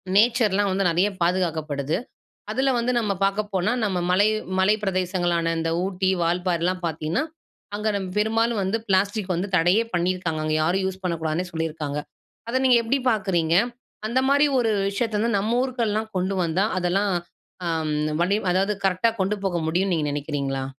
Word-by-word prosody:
நேச்சர்லாம் 210 Hz, -3 st, +3 dB
வந்து 190 Hz, 0 st, +1 dB
நெறைய 175 Hz, +4 st, +3 dB
பாதுகாக்கப்படுது. 160 Hz, -5 st, 0 dB, 0.5 s
அதுல 270 Hz, +1 st, +1 dB
வந்து 240 Hz, +2 st, 0 dB
நம்ப 215 Hz, -4 st, 0 dB
பாக்க 195 Hz, +1 st, +1 dB
போனா 190 Hz, +4 st, +1 dB
நம்ப 190 Hz, -3 st, 0 dB
மலை 200 Hz, +3 st, +4 dB, 0.3 s
மலை 190 Hz, +3 st, +4 dB
பிரதேசங்களான 175 Hz, -3 st, 0 dB
இந்த 165 Hz, 0 st, -1 dB
ஊட்டி, 190 Hz, 0 st, 0 dB
வால்பாறைலாம் 175 Hz, +1 st, 0 dB
பாத்தீங்கன்னா, 160 Hz, -, -1 dB, 0.5 s
அங்க 210 Hz, +1 st, -1 dB
நம்ப 190 Hz, -2 st, -4 dB
பெரும்பாலும் 225 Hz, +1 st, +1 dB
வந்து 190 Hz, +4 st, 0 dB
பிளாஸ்டிக் 195 Hz, 0 st, +1 dB
வந்து 180 Hz, +4 st, -2 dB
தடையே 180 Hz, +6 st, +4 dB
பண்ணியிருக்காங்க. 175 Hz, -2 st, 0 dB
அங்க 155 Hz, 0 st, 0 dB
யாரும் 180 Hz, +4 st, +1 dB
யூஸ் 190 Hz, 0 st, -5 dB
பண்ணக்கூடாதுன்னே 165 Hz, 0 st, -1 dB
சொல்லியிருக்காங்க. 160 Hz, -3 st, -3 dB, 0.5 s
அத 240 Hz, -, -1 dB
நீங்க 255 Hz, -2 st, +6 dB
எப்படி 245 Hz, +5 st, +1 dB
பாக்குறீங்க? 185 Hz, -7 st, +1 dB, 0.5 s
அந்த 250 Hz, +3 st, +2 dB
மாதிரி 285 Hz, +2 st, +5 dB
ஒரு 230 Hz, -2 st, +1 dB, 0.2 s
விஷயத்த 215 Hz, +1 st, -1 dB
வந்து 230 Hz, -1 st, +1 dB
நம்ப 215 Hz, +3 st, -1 dB
ஊருக்குலாம் 220 Hz, -4 st, -1 dB
கொண்டு 185 Hz, +2 st, -1 dB
வந்தா, 175 Hz, +4 st, +1 dB
அதெல்லாம் 190 Hz, +3 st, +1 dB, 1.1 s
வடி 190 Hz, +4 st, +2 dB, 0.2 s
அதாவது 195 Hz, +3 st, +1 dB
கரெக்டா 195 Hz, +5 st, +2 dB
கொண்டு 190 Hz, +2 st, +1 dB
போக 180 Hz, -3 st, 0 dB
முடியும்னு 180 Hz, +4 st, +1 dB
நீங்க -, -, +1 dB, 0.2 s
நினைக்கிறீங்களா? 140 Hz, -2 st, -2 dB
190 Hz, 150 wpm, -24 LUFS, 170-210 Hz, 1.1 s, நீங்க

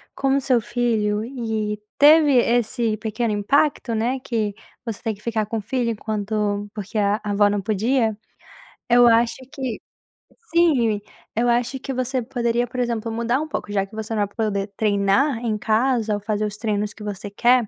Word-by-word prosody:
com 270 Hz, 0 st, +1 dB
o 275 Hz, -, +1 dB
seu 255 Hz, -3 st, +3 dB
filho 220 Hz, -3 st, 0 dB
e 220 Hz, -4 st, -3 dB, 0.2 s
teve 300 Hz, 0 st, +7 dB
esse 235 Hz, -2 st, +2 dB
pequeno 220 Hz, +1 st, -2 dB
impacto, 250 Hz, +4 st, +1 dB
né, 240 Hz, +4 st, 0 dB
que 220 Hz, -5 st, -2 dB, 0.3 s
você 225 Hz, -3 st, -4 dB
tem 225 Hz, -2 st, -1 dB
que 205 Hz, -, -15 dB
ficar 220 Hz, -2 st, -1 dB
com 225 Hz, +2 st, -3 dB
o -, -, -3 dB
filho 235 Hz, +2 st, -1 dB
enquanto 210 Hz, -1 st, -2 dB
porque 210 Hz, 0 st, -6 dB
a 205 Hz, +1 st, +1 dB
avó 205 Hz, 0 st, +3 dB
não 205 Hz, 0 st, -1 dB
podia, 220 Hz, +2 st, +1 dB, 0.7 s
eu 240 Hz, 0 st, +7 dB
acho 230 Hz, 0 st, +3 dB, 0.2 s
que 260 Hz, -6 st, -4 dB, 0.7 s
Sim. 250 Hz, -12 st, +3 dB, 0.3 s
Eu 240 Hz, +2 st, +2 dB
acho 245 Hz, +3 st, 0 dB
que 270 Hz, -, -5 dB
você 255 Hz, 0 st, -1 dB
poderia, 240 Hz, 0 st, -1 dB
por 250 Hz, +1 st, -6 dB
exemplo, 230 Hz, -2 st, -1 dB
mudar 235 Hz, +4 st, 0 dB
um 310 Hz, -, -4 dB
pouco. 210 Hz, -8 st, -5 dB
Já 195 Hz, -1 st, +1 dB
que 215 Hz, -, -14 dB
você 220 Hz, +1 st, -4 dB
não 210 Hz, -, +1 dB
vai 205 Hz, -, -26 dB
poder 205 Hz, -2 st, -1 dB
treinar 210 Hz, +5 st, +2 dB
em 225 Hz, -3 st, -1 dB
casa 225 Hz, 0 st, +1 dB
ou -, -, -3 dB
fazer 210 Hz, 0 st, -1 dB
os 210 Hz, 0 st, -4 dB
treinos 210 Hz, -2 st, -1 dB
que 215 Hz, -, -11 dB
você 205 Hz, 0 st, -5 dB
quer, 240 Hz, +2 st, +3 dB
225 Hz, 185 wpm, -22 LUFS, 210-245 Hz, 0.7 s, teve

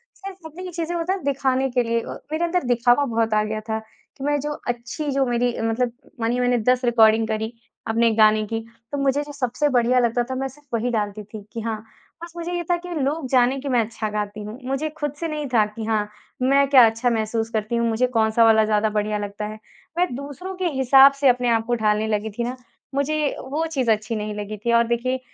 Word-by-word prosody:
सिर्फ़ 385 Hz, -3 st, -10 dB
अपनी 360 Hz, +4 st, -8 dB
चीजें 335 Hz, 0 st, -3 dB
होता 340 Hz, +2 st, 0 dB
है 385 Hz, -, -5 dB
दिखाने 270 Hz, -1 st, +1 dB
के 245 Hz, 0 st, +2 dB
लिए 230 Hz, 0 st, 0 dB
अ, -, -, -8 dB, 0.2 s
मेरे 315 Hz, +2 st, -1 dB
अंदर 355 Hz, 0 st, 0 dB
दिखावा 245 Hz, +3 st, +3 dB
बहुत 225 Hz, -2 st, 0 dB
आ 215 Hz, 0 st, +3 dB
गया 215 Hz, 0 st, -3 dB
था 220 Hz, -, 0 dB, 0.4 s
कि 270 Hz, -, -8 dB
मैं 290 Hz, 0 st, +1 dB
जो 295 Hz, +2 st, -3 dB, 0.2 s
अच्छी 245 Hz, +5 st, -3 dB
जो 270 Hz, 0 st, +2 dB
मेरी 245 Hz, 0 st, +1 dB
अ, -, -, -5 dB
मतलब 230 Hz, +2 st, 0 dB, 0.3 s
मानिए 235 Hz, +2 st, 0 dB
मैंने 245 Hz, 0 st, +2 dB
10 255 Hz, 0 st, 0 dB
रिकॉर्डिंग 225 Hz, -2 st, +4 dB
करी 220 Hz, +1 st, -2 dB, 0.3 s
अपने 230 Hz, +1 st, +3 dB
गाने 215 Hz, 0 st, +5 dB
की। 225 Hz, +1 st, -2 dB, 0.3 s
तो 285 Hz, -, -2 dB
मुझे 275 Hz, +1 st, +1 dB
जो 295 Hz, -, -9 dB
सबसे 275 Hz, +2 st, 0 dB
बढ़िया 250 Hz, 0 st, +3 dB
लगता 240 Hz, 0 st, +1 dB
था 260 Hz, +2 st, -5 dB
मैं 270 Hz, +1 st, -2 dB
सिर्फ़ 290 Hz, +3 st, -16 dB
वही 230 Hz, +2 st, 0 dB
डालती 210 Hz, -2 st, -2 dB
थी। 215 Hz, +1 st, -10 dB
कि 230 Hz, -, -4 dB
हाँ, 225 Hz, -1 st, -2 dB, 0.5 s
बस 340 Hz, -1 st, -9 dB
मुझे 345 Hz, +1 st, -4 dB
ये 350 Hz, 0 st, -1 dB
था 350 Hz, -, +4 dB
कि 355 Hz, +1 st, -10 dB
लोग 285 Hz, +1 st, -1 dB
जाने 255 Hz, 0 st, +3 dB
कि 275 Hz, +1 st, -5 dB
मैं 245 Hz, -2 st, +3 dB
अच्छा 215 Hz, -1 st, -4 dB
गाती 210 Hz, 0 st, -4 dB
हूँ। 210 Hz, +3 st, -7 dB
मुझे 275 Hz, +4 st, -1 dB
खुद 295 Hz, -2 st, -2 dB
से 335 Hz, -, -2 dB
नहीं 300 Hz, -2 st, -3 dB
था 215 Hz, -3 st, +5 dB
कि 215 Hz, +1 st, -7 dB
हाँ, 215 Hz, -2 st, 0 dB, 0.3 s
मैं 275 Hz, +2 st, +4 dB
क्या 260 Hz, -4 st, +8 dB
अच्छा 225 Hz, +3 st, -1 dB
महसूस 225 Hz, 0 st, -1 dB
करती 220 Hz, +1 st, -2 dB
हूँ, 235 Hz, 0 st, +1 dB
मुझे 230 Hz, +3 st, +1 dB
कौन-सा 225 Hz, -1 st, +2 dB
वाला 220 Hz, -1 st, +5 dB
ज़्यादा 215 Hz, 0 st, +2 dB
बढ़िया 210 Hz, 0 st, -1 dB
लगता 205 Hz, 0 st, -5 dB
है। 215 Hz, +1 st, -7 dB, 0.4 s
मैं 360 Hz, -, +3 dB
दूसरों 285 Hz, +8 st, -7 dB
के 370 Hz, -, -2 dB
हिसाब 265 Hz, +1 st, +7 dB
से 275 Hz, 0 st, +1 dB
अपने 245 Hz, 0 st, +2 dB
आप 225 Hz, -1 st, +2 dB
को 240 Hz, +1 st, 0 dB
ढालने 215 Hz, -1 st, +1 dB
लगी 215 Hz, 0 st, -1 dB
थी 240 Hz, -, 0 dB
ना 245 Hz, +2 st, -3 dB, 0.4 s
मुझे 280 Hz, +2 st, 0 dB, 0.3 s
वो 310 Hz, +4 st, -1 dB
चीज़ 260 Hz, -7 st, +1 dB
अच्छी 220 Hz, +2 st, -1 dB
नहीं 210 Hz, 0 st, -3 dB
लगी 210 Hz, +1 st, -5 dB
थी। 235 Hz, -, +2 dB
और 235 Hz, 0 st, +4 dB
देखिए 245 Hz, +2 st, 0 dB
240 Hz, 235 wpm, -23 LUFS, 220-275 Hz, 0.5 s, क्या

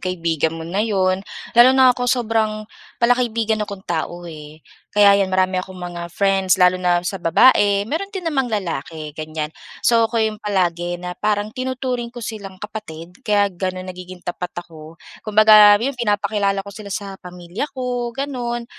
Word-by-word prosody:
kaibigan 170 Hz, -4 st, -1 dB
mo 165 Hz, -, -7 dB
na 180 Hz, +5 st, -2 dB
yun. 190 Hz, -4 st, +1 dB, 0.3 s
Lalo 250 Hz, +3 st, +6 dB
na 260 Hz, -1 st, +7 dB
ako 245 Hz, 0 st, -2 dB
sobrang 220 Hz, -3 st, 0 dB, 0.3 s
palakaibigan 230 Hz, -2 st, +1 dB
akong 200 Hz, -2 st, -5 dB
tao 175 Hz, +1 st, -3 dB
eh, 155 Hz, -2 st, -11 dB, 0.2 s
kaya 200 Hz, -1 st, +5 dB
yan 195 Hz, -, +1 dB
marami 185 Hz, 0 st, +1 dB
akong 185 Hz, 0 st, -10 dB
mga 175 Hz, -1 st, -6 dB
friends 195 Hz, +1 st, +2 dB
lalo 180 Hz, -1 st, +4 dB
na 175 Hz, -1 st, +1 dB
sa 190 Hz, +1 st, -3 dB
babae, 200 Hz, +3 st, +4 dB
meron 320 Hz, -, -3 dB
din 385 Hz, -3 st, -7 dB
namang 275 Hz, -6 st, 0 dB
lalaki, 165 Hz, -7 st, -4 dB
ganyan. 155 Hz, 0 st, -5 dB, 0.3 s
So, 230 Hz, -1 st, +4 dB
ako 235 Hz, -, -4 dB
yung 215 Hz, -1 st, -2 dB
palagi 175 Hz, -4 st, -1 dB
na 180 Hz, 0 st, -6 dB
parang 210 Hz, +2 st, -1 dB
tinuturing 255 Hz, -1 st, -3 dB
ko 240 Hz, -1 st, -8 dB
silang 200 Hz, -3 st, -7 dB
kapatid 180 Hz, -4 st, -9 dB
kaya 205 Hz, -5 st, +1 dB
ganun 185 Hz, 0 st, -4 dB
nagiging 180 Hz, 0 st, -10 dB
tapat 175 Hz, 0 st, -5 dB
ako. 165 Hz, -2 st, -10 dB, 0.2 s
Kumbaga, 215 Hz, -1 st, +7 dB
yun, 250 Hz, +7 st, -1 dB
pinapakilala 205 Hz, -4 st, 0 dB
ko 200 Hz, -, -9 dB
sila 205 Hz, 0 st, -9 dB
sa 195 Hz, -1 st, -6 dB
pamilya 180 Hz, +8 st, -6 dB
ko, 250 Hz, -1 st, -2 dB
ganun. 245 Hz, -4 st, -3 dB
200 Hz, 165 wpm, -20 LUFS, 180-230 Hz, 0.3 s, na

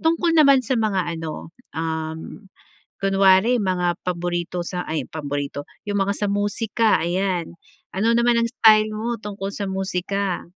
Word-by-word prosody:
tungkol 330 Hz, +1 st, +2 dB
naman 275 Hz, -3 st, +6 dB
sa 250 Hz, 0 st, 0 dB
mga 195 Hz, -6 st, 0 dB
ano, 160 Hz, 0 st, -6 dB, 0.3 s
uhm, 160 Hz, +4 st, -4 dB, 0.5 s
kunwari 195 Hz, +4 st, +4 dB
mga 180 Hz, -2 st, 0 dB
paborito 175 Hz, 0 st, -2 dB
sa 180 Hz, -1 st, -3 dB
ay, 160 Hz, -, -2 dB
paborito. 145 Hz, -2 st, -4 dB, 0.2 s
'Yong 205 Hz, 0 st, -1 dB
mga 195 Hz, +1 st, +1 dB
sa -, -, 0 dB
musika, 205 Hz, +2 st, +1 dB
ayan. 175 Hz, 0 st, -1 dB, 0.4 s
Ano 220 Hz, +4 st, +2 dB
naman 235 Hz, 0 st, +3 dB
ang 230 Hz, -, -1 dB
style 215 Hz, -2 st, +5 dB
mo 230 Hz, +3 st, -2 dB
tungkol 200 Hz, -1 st, -5 dB
sa 205 Hz, -, -3 dB
musika? 190 Hz, 0 st, -2 dB
195 Hz, 140 wpm, -22 LUFS, 175-215 Hz, 0.5 s, naman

